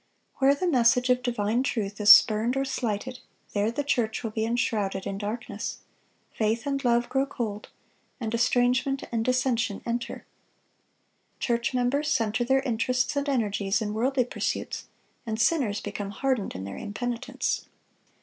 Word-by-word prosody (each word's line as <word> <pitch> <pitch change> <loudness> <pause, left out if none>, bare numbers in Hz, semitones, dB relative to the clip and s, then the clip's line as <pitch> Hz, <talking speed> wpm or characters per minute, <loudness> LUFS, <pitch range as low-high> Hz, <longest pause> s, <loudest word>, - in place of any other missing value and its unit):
Where 275 +1 +4
the 325 - -2
message 250 -5 +4
of 250 0 +2
divine 235 -1 0
truth 210 -6 -2
is 205 0 +8
spurned 220 +5 +6
or 270 - +1
slighted, 250 -1 -3 0.3
there 205 +1 +1
the 260 +5 -2
church 240 -6 0
will 225 - -3
be 220 0 -1
enshrouded 210 -5 -1
in 195 0 -4
darkness; 215 +4 -4 0.6
faith 225 +3 0
and 275 -1 -1
love 240 -1 +2
grow 270 +1 0
cold, 220 -6 -5 0.5
and 225 -2 -3
estrangement 250 +3 +2
and 230 -1 0
dissension 250 -3 +1
enter. 240 +1 -3 1.1
Church 235 +1 0
members 260 +4 +1
center 225 -1 +1
their 265 +2 +2
interests 250 +2 0
and 285 0 -1
energies 205 -5 0
in 210 -2 -3
worldly 250 +3 +1
pursuits, - - -3 0.4
and 220 0 -2
sinners 230 -8 +2
become 205 -1 -5
hardened 240 +1 -1
in 95 - -5
their 100 0 -6
impenitence. 235 +3 -3
235 Hz, 150 wpm, -27 LUFS, 215-255 Hz, 1.1 s, is